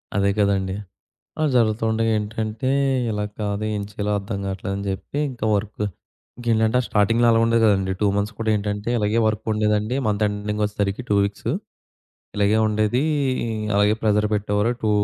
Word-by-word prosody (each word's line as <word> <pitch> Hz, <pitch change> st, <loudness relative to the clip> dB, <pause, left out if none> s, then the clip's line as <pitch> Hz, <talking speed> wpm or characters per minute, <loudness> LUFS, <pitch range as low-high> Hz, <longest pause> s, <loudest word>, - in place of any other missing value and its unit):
అదే 100 Hz, -1 st, +3 dB
కదండీ! 100 Hz, -2 st, +1 dB, 0.6 s
అలా 155 Hz, -, +1 dB
జరుగుతుండగా 115 Hz, 0 st, +2 dB
ఏంటంటే 110 Hz, +3 st, -3 dB, 0.4 s
ఇలా 105 Hz, -1 st, -1 dB, 0.2 s
కాదు, 105 Hz, 0 st, -2 dB
ఏం 105 Hz, -, -2 dB
చేయాలో 105 Hz, 0 st, -2 dB
అర్థం 100 Hz, +1 st, -4 dB
గాట్లేదని 95 Hz, +1 st, -4 dB
జెప్పి, 95 Hz, +8 st, -4 dB
ఇంకా 120 Hz, -3 st, -4 dB
వర్క్ 105 Hz, +1 st, -2 dB, 0.6 s
ఇంకేంటంటే, 115 Hz, 0 st, +2 dB
ఆ -, -, -7 dB
స్టార్టింగ్‌లో 115 Hz, +3 st, +3 dB
అలా 115 Hz, 0 st, +4 dB
ఉండేది 115 Hz, 0 st, +3 dB
గదండీ! 95 Hz, -2 st, +2 dB
2 105 Hz, -, +3 dB
మంత్స్ 105 Hz, +2 st, -1 dB
కూడా 110 Hz, -1 st, 0 dB
ఏంటంటే, 105 Hz, +2 st, -3 dB
ఇలగే 105 Hz, +1 st, +1 dB
వర్క్ 110 Hz, -2 st, -1 dB
ఉండేదండి 105 Hz, +2 st, +1 dB
మంత్ 105 Hz, 0 st, 0 dB
ఎండింగొచ్చేసరికి 105 Hz, +1 st, -2 dB
2 100 Hz, -, +4 dB
వీక్స్. 100 Hz, 0 st, -4 dB, 0.9 s
ఇలగే 105 Hz, +1 st, +3 dB
ఉండేదీ 110 Hz, +4 st, +1 dB, 0.7 s
అలగే 105 Hz, +1 st, +4 dB
ప్రెషర్ 105 Hz, -1 st, +3 dB
పెట్టేవారు. 105 Hz, +2 st, +1 dB
టూ 110 Hz, -, +2 dB
105 Hz, 150 wpm, -22 LUFS, 100-110 Hz, 0.9 s, అలా